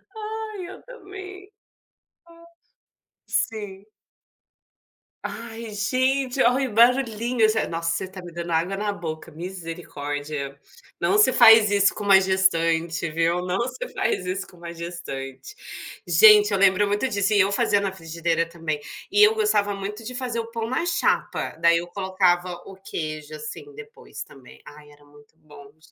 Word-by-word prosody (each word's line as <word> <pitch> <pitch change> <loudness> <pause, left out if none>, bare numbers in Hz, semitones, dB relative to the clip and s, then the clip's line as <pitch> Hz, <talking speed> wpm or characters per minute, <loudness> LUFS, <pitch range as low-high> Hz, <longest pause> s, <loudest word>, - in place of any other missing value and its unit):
Ai, 430 -3 -6
eu 385 - -11
também. 385 -4 -11 1.7
Sim. 205 -3 -3 1.4
Ai, 230 -1 -7
gente, 260 +5 0
olha 260 +2 +2
o 210 - -10
barulhinho, 235 -1 +3
já 220 0 0
Nossa, 165 0 -2
você 170 - -2
está 185 0 -10
me 175 - -9
dando 170 0 -6
água 180 +4 0
na 205 0 -2
boca, 160 -2 -7
misericórdia. 150 -5 -6 0.4
Não 410 - +1
se 420 - +5
faz 225 -1 +8
isso 200 0 +3
com 210 - -6
uma 195 -1 +7
gestante, 170 -3 +1
viu, 165 +2 +1
não 180 +3 -1
se - - -6
faz 185 - -1
isso 190 +2 -3
com - - -18
uma 170 0 -9
gestante. 170 - -7 0.5
Gente, 425 -1 +7
eu - - +2
lembro 195 +1 +4
muito 205 +5 0
disso 205 0 0
e 205 - +4
eu 195 +1 +2
fazia 200 0 +2
na 195 -1 -2
frigideira 165 -1 -2
também, 165 -3 -4 0.3
e 415 +1 +4
eu 430 +1 +6
gostava 205 - +1
muito 205 +3 -6
de 250 +2 -6
fazer 245 -2 -3
o 225 - -4
pão 230 -1 -4
na 260 +7 -1
chapa, 345 - -1
daí 170 0 +4
eu 175 - -7
colocava 185 -1 0
o 195 - -11
queijo, 155 -5 -6
assim, 155 - -7
depois 435 +2 -10
também. 135 -2 -17
Ai, 150 0 -14
era 145 0 -20
muito 145 +1 -21
bom, 145 -2 -15
gente, 155 - -32
195 Hz, 155 wpm, -24 LUFS, 165-235 Hz, 1.7 s, faz